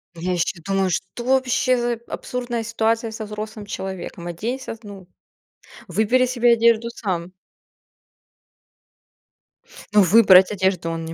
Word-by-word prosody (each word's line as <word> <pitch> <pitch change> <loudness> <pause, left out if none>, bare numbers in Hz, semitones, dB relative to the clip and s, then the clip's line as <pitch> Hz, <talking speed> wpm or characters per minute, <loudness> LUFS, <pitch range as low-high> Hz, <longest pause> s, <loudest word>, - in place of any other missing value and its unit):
Я 180 +2 -2
ещё 170 0 -2
думаю, 195 -1 0
что 190 +7 -4
вообще 255 0 +2
за 240 0 0
абсурдная 240 -2 -4
ситуация 225 +1 0
со 220 0 -6
взрослым 215 0 -7
человеком? 190 -3 -6
Оденься, 225 +8 -5
ну 195 -3 -11 0.8
выбери 220 +8 +2
себе 240 -1 +3
одежду 230 0 +3
сам. 185 -6 -4 2.6
Ну 210 - +8
выбрать 190 -1 +6
одежду 190 -4 0
он 165 0 -4
не 165 - -6
210 Hz, 120 wpm, -22 LUFS, 185-235 Hz, 2.6 s, Ну